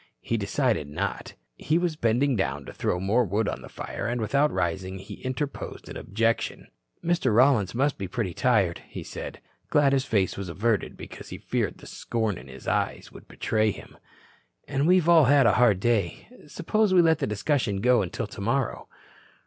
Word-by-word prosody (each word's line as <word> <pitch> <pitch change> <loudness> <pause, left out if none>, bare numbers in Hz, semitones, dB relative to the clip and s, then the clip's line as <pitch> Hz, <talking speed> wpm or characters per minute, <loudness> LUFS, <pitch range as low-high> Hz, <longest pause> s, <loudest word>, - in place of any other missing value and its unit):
He 115 - -2
decided 110 - 0
not. 75 - -4 0.2
He 155 - +1
was 175 -2 0
bending 125 +1 +2
down 75 -9 -2
to - - -9
throw 90 - -1
more 105 +7 +2
wood 105 +1 0
on - - -3
the - - -11
fire - - -5
and 120 +1 -1
without 140 +7 +2
rising 95 +1 -2
he 95 - -10
interposed 130 +2 -4
an - - -8
objection. 115 +3 -1 0.4
"Mr. 165 -10 +2
Rollins 120 -5 +4
must 140 +3 +1
be 95 - -3
pretty 100 -3 -3
tired," 100 -8 +2
he - - -7
said, - - -7 0.3
glad 140 -2 +4
his 135 -1 +2
face 100 -7 0
was 100 -2 -5
averted 105 +4 -1
because - - -10
he - - -6
feared - - -2
the - - -14
scorn 110 -5 -2
in 65 - -13
his 65 -1 -11
eyes - - -1
would - - -14
betray 110 -1 0
him. - - -8 0.7
"And 140 +2 0
we've 180 -2 +4
all 165 -3 +7
had 140 0 +5
a 115 - +5
hard 110 -6 +5
day. 105 -5 0 0.2
Suppose 205 +6 +1
we 175 - +7
let 160 -1 +3
the - - -1
discussion 105 0 0
go 125 +1 +4
until 95 +4 -3
tomorrow." 115 +6 -2
115 Hz, 185 wpm, -26 LUFS, 100-140 Hz, 0.7 s, all